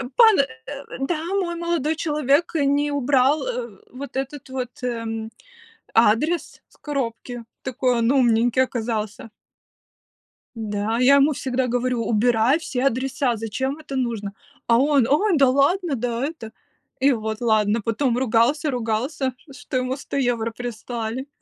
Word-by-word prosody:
Пан 445 Hz, -3 st, +7 dB
э, 275 Hz, +1 st, -3 dB, 0.2 s
да, 310 Hz, +4 st, -2 dB, 0.2 s
мой 345 Hz, -3 st, -2 dB
молодой 335 Hz, -3 st, -1 dB
человек 300 Hz, 0 st, +1 dB
не 290 Hz, 0 st, +2 dB
убрал, 280 Hz, -, +2 dB
э, -, -, -4 dB
вот 275 Hz, +2 st, -8 dB
этот 270 Hz, 0 st, -5 dB
вот, 255 Hz, -1 st, -5 dB
м, 225 Hz, -2 st, -3 dB, 0.6 s
адрес 255 Hz, +9 st, +2 dB
с -, -, -25 dB
коробки, 245 Hz, -4 st, -4 dB, 0.2 s
такой 255 Hz, -1 st, 0 dB
он 230 Hz, +1 st, +2 dB
умненький 245 Hz, -1 st, +3 dB
оказался. 225 Hz, -3 st, -3 dB, 1.3 s
Да, 215 Hz, +1 st, -2 dB
я 265 Hz, +3 st, +6 dB
ему 280 Hz, +2 st, +5 dB
всегда 255 Hz, -1 st, -1 dB
говорю: 245 Hz, -1 st, -1 dB
"Убирай 235 Hz, +5 st, +3 dB
все 260 Hz, -5 st, -3 dB
адреса, 260 Hz, -1 st, 0 dB
зачем 260 Hz, +6 st, -3 dB
это 280 Hz, -3 st, -7 dB
нужно?" 225 Hz, -6 st, -2 dB, 0.3 s
А 230 Hz, -, +5 dB
он: 275 Hz, -2 st, +3 dB
"Ой, 395 Hz, +9 st, +3 dB
да 270 Hz, -2 st, +5 dB
ладно, 290 Hz, +4 st, +2 dB
да 240 Hz, +1 st, -2 dB
это!" 295 Hz, -9 st, -8 dB, 0.5 s
И 275 Hz, +2 st, +4 dB
вот 220 Hz, -1 st, -3 dB
ладно. 215 Hz, -1 st, +2 dB
Потом 235 Hz, +3 st, 0 dB
ругался-ругался, 255 Hz, +1 st, 0 dB, 0.2 s
что 270 Hz, -1 st, -5 dB
ему 255 Hz, +2 st, -1 dB
100 280 Hz, -, -7 dB
евро 240 Hz, -4 st, 0 dB
прислали. 235 Hz, +2 st, -5 dB
255 Hz, 135 wpm, -23 LUFS, 230-280 Hz, 1.3 s, Пан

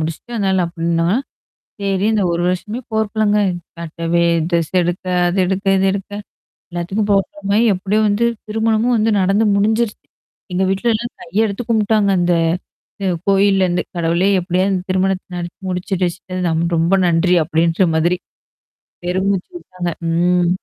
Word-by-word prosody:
முடிச்சுட்டு, 165 Hz, +9 st, -5 dB
அதனால 190 Hz, -4 st, +1 dB
அப்டின்னா! 170 Hz, 0 st, -1 dB, 0.7 s
செரி 195 Hz, -1 st, 0 dB
இந்த 215 Hz, -, +1 dB
1 170 Hz, +1 st, -1 dB
வருஷமே 210 Hz, +6 st, -3 dB
போர்கக்கலங்க. 215 Hz, -1 st, +1 dB, 0.4 s
கட்டவே 165 Hz, +1 st, -1 dB, 0.3 s
டிரஸ் 170 Hz, -3 st, 0 dB
எடுக்க, 175 Hz, +2 st, -3 dB, 0.2 s
அது 180 Hz, -, -1 dB
எடுக்க, 195 Hz, +2 st, -2 dB
இது 195 Hz, -, +2 dB
எடுக்க 200 Hz, 0 st, -5 dB, 0.6 s
எல்லாத்துக்கும் 185 Hz, +5 st, -2 dB
போர்க்களமாயி, 200 Hz, +2 st, +1 dB
எப்டியோ 200 Hz, +3 st, 0 dB
வந்து 215 Hz, +4 st, +2 dB, 0.2 s
திருமணமும் 225 Hz, +2 st, +1 dB
வந்து 220 Hz, +1 st, +2 dB
நடந்து 195 Hz, +4 st, +2 dB
முடிஞ்சிருச்சு. 220 Hz, +2 st, 0 dB, 0.5 s
எங்க 180 Hz, +1 st, 0 dB
வீட்ல 195 Hz, +5 st, 0 dB
எல்லாம் 235 Hz, +2 st, -3 dB
கைய 225 Hz, -2 st, 0 dB
எடுத்து 200 Hz, +4 st, -5 dB
கும்பிட்டாங்க 215 Hz, -2 st, +2 dB
அந்த. 175 Hz, 0 st, +2 dB, 0.7 s
அ -, -, 0 dB, 0.2 s
கோயில்லருந்து, 195 Hz, -2 st, +3 dB
"கடவுளே 170 Hz, +2 st, +1 dB
எப்டியாவது 185 Hz, +2 st, 0 dB
திருமணத்த 190 Hz, 0 st, 0 dB
நடத்தி 175 Hz, 0 st, -6 dB
முடிச்சு 180 Hz, +2 st, -4 dB
வச்சிட்ட, 180 Hz, 0 st, -2 dB, 0.2 s
ரொம்ப 165 Hz, +3 st, +2 dB
நன்றி" 175 Hz, +1 st, +3 dB
அப்டின்ற 165 Hz, +3 st, +2 dB
மாதிரி. 170 Hz, +3 st, +2 dB, 0.9 s
பெருமூச்சு 190 Hz, -, -1 dB
வுட்டாங்க 185 Hz, -, -5 dB, 0.2 s
ம். 175 Hz, +1 st, +2 dB
190 Hz, 130 wpm, -18 LUFS, 175-205 Hz, 0.9 s, கோயில்லருந்து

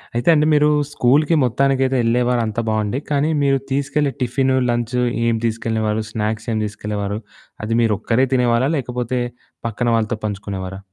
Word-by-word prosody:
అయితే 120 Hz, +7 st, +1 dB
అండి 150 Hz, -1 st, +3 dB
మీరు 150 Hz, 0 st, +4 dB, 0.2 s
స్కూల్‌కి 145 Hz, +5 st, +3 dB
మొత్తానికైతే 135 Hz, +1 st, +1 dB
ఎళ్ళేవారు 120 Hz, +1 st, +2 dB
అంతా 110 Hz, +2 st, -2 dB
బావుండి. 110 Hz, +3 st, 0 dB
కానీ 145 Hz, +2 st, +2 dB
మీరు 135 Hz, -1 st, +3 dB
తీసుకెళ్ళే 140 Hz, 0 st, 0 dB
టిఫిను, 130 Hz, +1 st, +1 dB
లంచ్, 120 Hz, +1 st, -1 dB, 0.3 s
ఏం 115 Hz, -, +2 dB
తీసుకెళ్ళేవారు? 110 Hz, -1 st, -1 dB
స్నాక్స్ 110 Hz, +1 st, -3 dB
ఏం 110 Hz, -, 0 dB
తీసుకెళ్ళేవారు? 105 Hz, -1 st, -4 dB, 0.5 s
అది 115 Hz, -, 0 dB
మీరొక్కరే 115 Hz, +3 st, +2 dB
తినేవారా? 125 Hz, +1 st, +2 dB
లేకపోతే 125 Hz, -1 st, -2 dB, 0.5 s
పక్కన 120 Hz, +2 st, -2 dB
వాళ్ళతో 110 Hz, -1 st, -1 dB
పంచుకునేవారా? 95 Hz, -2 st, -5 dB
120 Hz, 135 wpm, -20 LUFS, 110-135 Hz, 0.5 s, మీరు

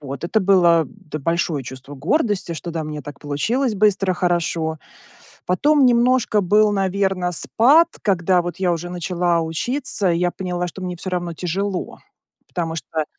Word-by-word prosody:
Вот, 140 Hz, +1 st, -7 dB
это 215 Hz, +5 st, +1 dB
было 175 Hz, -4 st, +4 dB
д 155 Hz, +4 st, -9 dB
большое 165 Hz, -2 st, -1 dB
чувство 130 Hz, +3 st, -9 dB
гордости, 190 Hz, -, 0 dB
что 170 Hz, +1 st, -6 dB
да, 165 Hz, -1 st, -3 dB
у -, -, -6 dB
меня 150 Hz, -1 st, -6 dB
так 145 Hz, -1 st, -9 dB
получилось 220 Hz, -, -1 dB
быстро, 195 Hz, -2 st, +2 dB
хорошо. 170 Hz, -3 st, -1 dB, 0.7 s
Потом 285 Hz, +9 st, +3 dB
немножко 240 Hz, -3 st, +3 dB
был, 210 Hz, +3 st, +3 dB
наверно, 190 Hz, -2 st, 0 dB
спад. 280 Hz, -, +4 dB
Когда, 180 Hz, -2 st, +2 dB
вот 175 Hz, +1 st, -6 dB
я 180 Hz, -2 st, +1 dB
уже 170 Hz, +1 st, -4 dB
начала 175 Hz, -1 st, 0 dB
учиться, 195 Hz, -, -1 dB
я 175 Hz, +1 st, +1 dB
поняла, 180 Hz, -1 st, -3 dB
что 180 Hz, +2 st, -8 dB
мне 180 Hz, -1 st, -4 dB
всё 185 Hz, -, -5 dB
равно 175 Hz, -1 st, -2 dB
тяжело. 185 Hz, +3 st, -3 dB, 0.5 s
Потому 165 Hz, -2 st, -3 dB
что 160 Hz, -1 st, -3 dB
180 Hz, 160 wpm, -21 LUFS, 165-200 Hz, 0.7 s, было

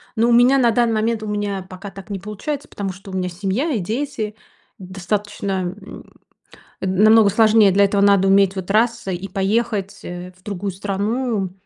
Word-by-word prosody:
Ну, 230 Hz, +1 st, +2 dB
у -, -, +4 dB
меня 245 Hz, +3 st, +5 dB
на 240 Hz, -3 st, +4 dB
данный 235 Hz, 0 st, +2 dB
момент 220 Hz, +1 st, 0 dB
у -, -, -5 dB
меня 205 Hz, -2 st, -3 dB
пока 195 Hz, +2 st, -9 dB
так 195 Hz, +2 st, -12 dB
не 200 Hz, -1 st, -4 dB
получается, 210 Hz, +9 st, -5 dB
потому 195 Hz, -2 st, -5 dB
что 195 Hz, +1 st, -12 dB
у -, -, -10 dB
меня 180 Hz, -1 st, -1 dB
семья 195 Hz, -, -2 dB
и 240 Hz, -, 0 dB
дети. 220 Hz, +1 st, -3 dB, 0.4 s
Достаточно, 195 Hz, +2 st, -4 dB, 0.3 s
м, 195 Hz, -, -11 dB, 0.8 s
э, -, -, -2 dB
намного 210 Hz, +3 st, +5 dB
сложнее. 215 Hz, -1 st, +5 dB
Для 200 Hz, +2 st, +4 dB
этого 200 Hz, 0 st, +1 dB
надо 200 Hz, -1 st, +4 dB
уметь 195 Hz, 0 st, +4 dB
вот 185 Hz, -1 st, -5 dB
раз- 230 Hz, 0 st, +1 dB
и 190 Hz, +1 st, -4 dB
поехать, 200 Hz, +1 st, -1 dB
э, 180 Hz, +1 st, -8 dB
в 185 Hz, -, -27 dB
другую 200 Hz, -1 st, -4 dB
страну. 205 Hz, +2 st, -2 dB
200 Hz, 185 wpm, -20 LUFS, 190-225 Hz, 0.8 s, меня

